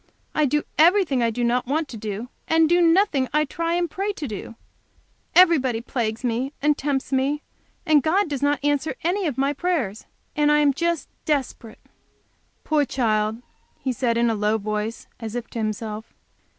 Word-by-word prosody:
I 305 - +2
do 295 +2 +1 0.2
everything 330 -5 +4
I 230 - +2
do 240 +2 -2
not 245 +1 +1
want 305 +3 0
to 240 - -8
do, 215 +2 -5 0.2
and 320 0 +4
do 345 +2 +3
nothing 330 -5 +3
I 305 0 +3
try 335 +3 -2
and 350 0 +1
pray 390 +6 -2
to 305 -7 -5
do. 215 +1 -7 0.8
Everybody 290 -10 +5
plagues 230 -1 -3
me 250 +3 -1
and 295 +1 +2
tempts 280 -1 -2
me. 275 +3 0 0.4
And 305 -2 +5
God 365 +8 +2
does 285 -3 -4
not 285 0 +1
answer 290 +1 0
any 360 +2 0
of 275 -5 -3
my 275 +2 +1
prayers, 280 - -2 0.3
and 295 0 +3
I 300 - +5
am 290 -2 +4
just 340 +2 -1 0.2
desperate." 260 -6 -2 0.9
"Poor 305 -2 +2
child!" 220 -3 0 0.3
he 260 - -2
said, 235 -1 0
in 235 0 +3
a - - 0
low 210 +1 +1
voice, 215 +1 -3
as 225 -1 -6
if 240 -1 -3
to 230 - -5
himself. 215 0 -4
275 Hz, 180 wpm, -23 LUFS, 230-310 Hz, 0.9 s, Everybody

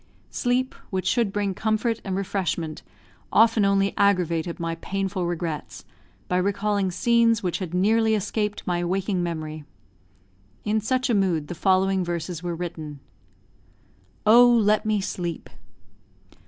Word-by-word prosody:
Sleep, 255 +1 0 0.2
which 185 -1 -2
should 220 +1 +1
bring 200 -1 -1
comfort 220 +3 -1
and 190 -2 -3
refreshment, 185 -5 -2 0.5
often 225 -1 +4
only 195 0 +2
aggravated 175 -4 +1
my 165 0 -2
painful 190 +1 -3
regrets, 165 -3 -4 0.4
by 180 - 0
recalling 200 +1 0
scenes 230 +3 +2
which 180 -2 -1
had 180 -2 -4
nearly 220 +4 +3
escaped 210 0 -2
my 175 -1 -1
waking 185 +1 -1
memory. 155 -3 -4 1.0
In 215 +1 +1
such 255 +4 0
a - - +2
mood 180 -7 +1
the - - -3
following 190 +1 +2
verses 170 -1 -4
were 175 -1 -3
written: 160 -4 -6 1.3
OH, 240 +3 +7
LET 215 -1 +2
ME 210 -2 +1
SLEEP! 175 -3 -4
195 Hz, 130 wpm, -24 LUFS, 175-215 Hz, 1.3 s, OH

